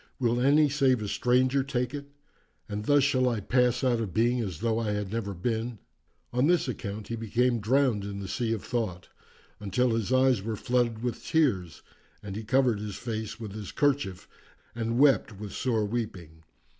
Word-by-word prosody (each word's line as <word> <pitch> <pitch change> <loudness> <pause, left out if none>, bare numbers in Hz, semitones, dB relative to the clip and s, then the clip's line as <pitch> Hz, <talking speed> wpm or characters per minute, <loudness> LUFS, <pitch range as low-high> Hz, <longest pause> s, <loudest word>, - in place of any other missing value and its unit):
Will 120 -1 +1
any 145 +3 +5
save 135 -3 +2
a - - -3
stranger 130 +5 +2
take 125 -2 -2
it? 140 -1 -6 0.6
And 105 -1 -4
thus 145 +1 +4
shall 130 -2 +3
I 115 -3 -1
pass 125 +4 +1
out 125 -3 +2
of 110 -5 -4
being 120 +3 +2
as 95 -5 -5
though 115 -1 +1
I 110 -2 -1
had 105 -2 -3
never 105 -3 -3
been!' 115 +5 -2 0.6
On 125 +4 +3
this 175 -4 +3
account 105 -3 -5
he 115 - -2
became 115 +2 +1
drowned 120 -1 +2
in 100 0 -5
the 100 - -5
sea 115 +4 -2
of 110 -3 -2
thought, 110 -8 -3 0.5
until 105 +5 +1
his 115 0 -1
eyes 130 -4 +4
were 110 +2 -3
flooded 120 0 0
with 125 -2 -3
tears 105 - 0 0.4
and 100 -1 -6
he 110 - -5
covered 125 -1 +2
his 105 -2 -5
face 110 -2 -5
with 110 -4 -7
his 105 -2 -7
kerchief 140 -10 0 0.5
and 115 0 -2
wept 135 -6 +3
with 105 0 -7
sore 115 -5 0
weeping. 90 -8 -5
115 Hz, 185 wpm, -28 LUFS, 105-125 Hz, 0.6 s, any